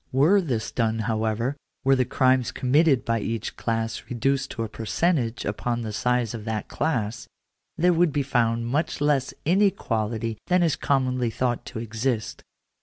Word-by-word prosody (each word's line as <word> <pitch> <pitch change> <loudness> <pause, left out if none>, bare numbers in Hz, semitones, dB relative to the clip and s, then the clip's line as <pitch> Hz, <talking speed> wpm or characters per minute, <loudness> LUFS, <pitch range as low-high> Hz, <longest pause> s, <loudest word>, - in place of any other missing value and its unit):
Were 155 +10 +4
this 125 -10 -2
done, 115 -2 0
however 110 +3 -1
— - - -54
were 135 0 +5
the 130 -1 +2
crimes 130 0 +2
committed 135 0 +3
by 115 0 +1
each 115 +2 -3
class 115 -1 -2
reduced 135 +2 0
to 115 - -4
a - - -3
per 110 +1 -8
centage 120 - 0
upon 120 +3 -2
the 110 -2 -5
size 125 +1 0
of 115 -2 -6
that 110 -1 -3
class, 120 -7 -2 0.5
there 175 +2 +4
would 170 -1 +3
be 145 0 0
found 115 -3 +1
much 145 +7 -1
less 145 -3 +1
inequality 115 - 0
than 180 0 +3
is 165 -3 +2
commonly 130 -3 +1
thought 120 +1 -1
to 125 - -7
exist. 115 +1 -2
125 Hz, 170 wpm, -25 LUFS, 115-140 Hz, 0.5 s, were